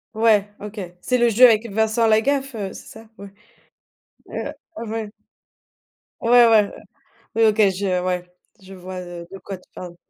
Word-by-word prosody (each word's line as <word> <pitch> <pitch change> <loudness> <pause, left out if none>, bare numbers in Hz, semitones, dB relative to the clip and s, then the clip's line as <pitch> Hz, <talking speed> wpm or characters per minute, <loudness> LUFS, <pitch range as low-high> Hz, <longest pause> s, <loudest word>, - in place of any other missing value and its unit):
Ouais, 215 -2 +3
OK, 210 +1 -8 0.2
c'est 250 +5 0
le 240 0 +4
jeu 235 +3 +7
avec 230 0 +3
Vincent 220 +2 +1
Lagaffe, 270 +4 +1
heu, 195 -3 -5
c'est - - -12
ça? 225 +1 -13
Ouais, 200 -1 -10 1.0
heu - - -4 0.4
ouais. 220 -2 -4 1.1
Ouais, 240 0 +6
ouais. 215 -2 +4 0.7
Oui. 225 - +3
OK, 215 0 +3
je, 195 +2 -4
heu 180 -1 0
ouais, 180 -1 -2 0.4
je 190 0 -13
vois, 185 0 -8
heu, 175 -1 -9
de 195 - -8
quoi 195 0 -8
tu 185 - -25
parles. 175 -1 -9
210 Hz, 165 wpm, -21 LUFS, 190-225 Hz, 1.1 s, jeu